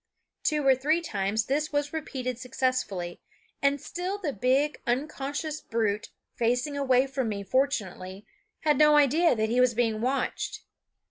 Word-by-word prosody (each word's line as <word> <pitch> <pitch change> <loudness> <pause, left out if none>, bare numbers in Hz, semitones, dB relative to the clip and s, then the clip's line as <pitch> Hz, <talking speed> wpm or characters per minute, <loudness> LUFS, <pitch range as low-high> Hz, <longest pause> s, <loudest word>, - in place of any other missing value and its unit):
Two 300 -2 0
or 270 - +7
three 295 +6 +1
times 215 - -1
this 300 +4 -1
was 290 0 -1
repeated 255 -6 -4
successfully, 250 -9 -2 0.4
and 280 0 +2
still 360 +7 -4
the 330 -9 -3
big, 265 +7 +1
unconscious 285 +4 -2
brute, 215 -2 -1 0.2
facing 245 +5 0
away 260 -2 +3
from 265 -3 -2
me 200 -1 -3
fortunately, 200 -6 -1 0.4
had 300 -1 +2
no 300 0 +6
idea 295 +3 +4
that 220 -1 0
he 240 +2 +1
was 250 -2 +3
being 225 -2 +1
watched. 260 +3 -2
260 Hz, 145 wpm, -27 LUFS, 230-295 Hz, 0.4 s, or